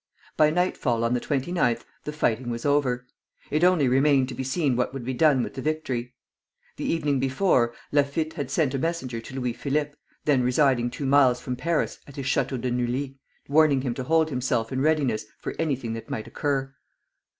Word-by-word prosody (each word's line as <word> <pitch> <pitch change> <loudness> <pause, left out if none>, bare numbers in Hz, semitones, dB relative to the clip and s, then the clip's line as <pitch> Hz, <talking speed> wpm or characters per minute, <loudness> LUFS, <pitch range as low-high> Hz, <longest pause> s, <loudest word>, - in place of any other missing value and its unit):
By 155 -1 +5
nightfall 155 -8 0
on 115 +1 +1
the 125 - +1
29th 135 -4 0 0.2
the 150 - -3
fighting 125 -5 0
was 115 0 -4
over. 135 -4 +1 0.5
It 155 +3 +1
only 180 -6 +4
remained 135 0 +3
to - - -5
be 130 +2 -4
seen 135 0 0
what 125 +2 -1
would 130 -3 -5
be 130 - -2
done 140 -2 +4
with - - -5
the 130 - -5
victory. 130 -5 -3 0.6
The - - -4
evening 150 -4 +1
before, 130 -3 +2 0.2
Laffitte 145 +2 +1
had 140 -4 -4
sent 140 -1 +1
a 135 - -1
messenger 130 -7 -2
to 125 - -10
Louis 125 -2 -1
Philippe, 145 +3 -1 0.3
then 140 -4 +3
residing 125 -1 +2
two 125 +3 -5
miles 135 -2 +4
from 125 - -4
Paris, 165 +5 -1
at 140 - -12
his 140 - -5
Château 130 0 0
de 125 +1 -2
Neuilly, 130 +3 -2 0.3
warning 145 -2 +4
him 130 -3 -2
to 130 - -4
hold 160 +1 +2
himself 125 -3 -1
in 130 0 -1
readiness 140 -8 +1
for - - -5
anything 135 -8 -1
that 115 - -7
might 110 - -4
occur. 135 -2 -2
135 Hz, 195 wpm, -25 LUFS, 125-150 Hz, 0.6 s, By